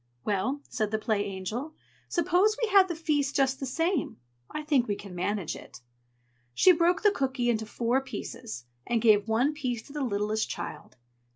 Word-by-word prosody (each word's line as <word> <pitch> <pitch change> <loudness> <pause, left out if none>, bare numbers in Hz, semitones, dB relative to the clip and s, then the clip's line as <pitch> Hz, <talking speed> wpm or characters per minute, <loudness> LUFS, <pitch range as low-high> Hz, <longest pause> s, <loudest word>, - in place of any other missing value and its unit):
"Well," 215 +8 0
said 215 -3 -1
the 215 - 0
Play 215 -1 0
Angel, 215 - -5 0.3
"suppose 365 +5 +2
we 465 - +1
have 390 -2 +6
the 345 - -3
feast 295 -3 0
just 270 -1 +2
the 270 - -3
same! 330 +4 -1 0.3
I 305 - -5
think 285 -5 +2
we 205 - 0
can 200 -2 -10
manage 185 0 -2
it." 120 - -12 0.8
She 370 - +7
broke 345 +2 +2
the 415 - +6
cooky 260 -7 0
into 220 -1 -2
four 240 +4 0
pieces, 125 - -7 0.2
and 235 - +2
gave 215 -2 +4
one 240 +7 +2
piece 250 -6 -3
to 280 - -14
the 295 - -3
littlest 215 -2 -1
child. - - -6
250 Hz, 180 wpm, -28 LUFS, 215-305 Hz, 0.8 s, She